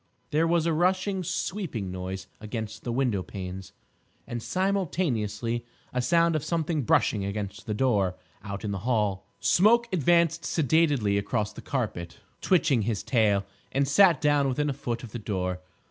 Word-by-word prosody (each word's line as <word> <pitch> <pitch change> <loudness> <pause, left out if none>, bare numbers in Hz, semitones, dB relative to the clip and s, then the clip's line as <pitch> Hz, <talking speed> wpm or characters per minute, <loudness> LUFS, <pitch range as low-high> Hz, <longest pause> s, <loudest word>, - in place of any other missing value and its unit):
There 160 +3 +3
was 165 -1 +2
a 165 - +2
rushing, 185 +3 +1
sweeping 160 - -3
noise 95 +1 -5
against 110 0 -5
the 120 - -3
window 120 -6 +1
panes, 95 0 -7 0.5
and 120 -1 -5
simultaneously 130 - -1 0.3
a 125 - +1
sound 170 +4 +3
of 155 - -1
something 160 -1 -1
brushing 105 -3 +2
against 100 0 -5
the 105 - -1
door—out 100 -2 -2
in 105 - -2
the 100 - -3
hall. 105 -4 0
Smoke 235 +6 +4
advanced 170 0 +3
sedately 145 -9 +2
across 105 +1 -2
the - - -9
carpet, 90 - -3 0.2
twitching 145 -9 +3
his 105 -1 -2
tail, 105 -5 +2 0.3
and 140 +1 +1
sat 170 +4 +5
down 145 -2 +3
within 145 +3 0
a - - -3
foot 120 -3 -4
of 115 - -9
the 120 - -5
door. 95 -4 -2
120 Hz, 155 wpm, -27 LUFS, 105-165 Hz, 0.5 s, sat